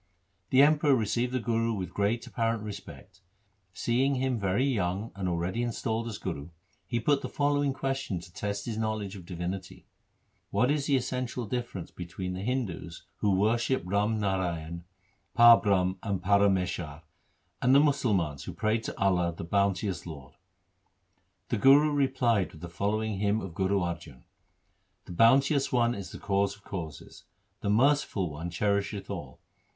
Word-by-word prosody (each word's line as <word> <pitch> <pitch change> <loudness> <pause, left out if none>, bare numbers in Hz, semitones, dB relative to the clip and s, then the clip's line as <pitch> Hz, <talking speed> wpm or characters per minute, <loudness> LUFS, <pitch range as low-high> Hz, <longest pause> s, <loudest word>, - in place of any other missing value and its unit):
The 130 +1 +6
Emperor 150 -1 +4
received 120 +2 0
the 130 - 0
Guru 115 0 0
with 90 -4 -5
great 105 +4 0
apparent 115 -3 -1
respect. 105 -1 -9 0.5
Seeing 130 +7 +1
him 130 -2 0
very 100 +6 +1
young 100 -4 -1
and 95 -2 -3
already 90 +6 -1
installed 115 -1 -2
as 110 -3 -5
Guru, 85 -6 -5 0.4
he 120 - -1
put 140 +5 +2
him - - -17
the - - -5
following 145 -1 +1
question 135 -8 -2
to 85 0 -14
test 100 0 -3
his 110 -2 -3
knowledge 110 -3 -2
of 90 -3 -11
divinity: 90 +1 -5 0.2
— - - -45
' - - -44
What 120 +7 +2
is 145 -1 0
the 140 - +3
essential 125 -1 -2
difference 120 -5 -4
between 90 +1 -6
the 90 - -5
Hindus 105 -8 -3
who 100 -2 +2
worship 115 +5 +1
Ram 105 +4 +1
Narayan, 85 -4 -2 0.5
Parbrahm, 100 -6 +6
and 100 -4 -2
Para 100 +1 +4
meshar, 90 -5 -2 0.6
and 130 +2 +4
the - - +8
Musalmans 105 - +1
who - - -6
pray 110 +1 0
to - - -7
Allah, 90 -3 +2
the - - -5
bounteous 100 +1 0
Lord? 70 -3 -9 0.6
' - - -45
The - - 0
Guru 145 +5 +6
replied 130 -8 +1
with 80 - -13
the 85 - -7
following 105 +3 -1
hymn 105 +1 +1
of 95 -5 -7
Guru 95 +2 +1
Arjan: 85 -6 -5 0.4
— - - -45
The - - -10
Bounteous 135 - +4
One 120 -1 +2
is 100 -6 -7
the - - -8
Cause 100 0 0
of 100 - -23
causes; 80 -8 -8 0.3
The 100 - -2
Merciful 115 - +2
One 80 +4 -5
cherisheth 100 +2 -1
all. - - -7
100 Hz, 165 wpm, -29 LUFS, 90-120 Hz, 0.6 s, the